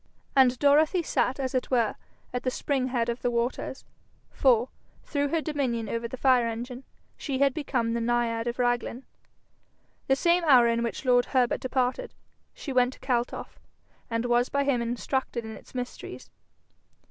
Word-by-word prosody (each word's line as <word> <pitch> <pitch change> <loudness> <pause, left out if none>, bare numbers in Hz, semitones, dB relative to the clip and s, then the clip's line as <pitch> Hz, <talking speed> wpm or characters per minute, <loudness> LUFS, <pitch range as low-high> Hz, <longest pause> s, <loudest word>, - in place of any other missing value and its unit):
And 260 -2 +5
Dorothy 300 +6 +4
sat 265 -3 0
as 260 -2 -2
it 255 - -1
were 235 -4 +2 0.4
at 250 - -1
the 255 - 0
spring 260 0 -1
head 240 -2 0
of 235 +1 -3
the 245 - +1
waters, 240 +2 -2 0.5
for, 250 -2 +3 0.3
through 285 -1 -1
her 320 +3 0
dominion 260 -8 -2
over 230 +2 -3
the 260 - -7
fire 250 -2 +4
engine, 245 +3 -6 0.3
she 275 -3 -3
had 275 0 +3
become 250 -6 -1
the 235 - -1
naiad 235 -1 0
of 240 - -2
Raglan. 245 +1 -1 1.0
The 270 - +4
same 345 +5 +2
hour 255 -6 +7
in 230 0 +1
which 235 +3 -3
lord 245 -1 +4
Herbert 250 -3 +1
departed 255 - -1 0.4
she 275 - -6
went 250 0 +3
to - - -17
Kaltoff, 245 -2 -2 0.5
and 230 0 -1
was 240 +1 +2
by 280 0 +1
him 275 -4 +1
instructed 240 0 -2
in 220 - -6
its - - -16
mysteries. 250 0 -7
250 Hz, 170 wpm, -27 LUFS, 235-270 Hz, 1.0 s, hour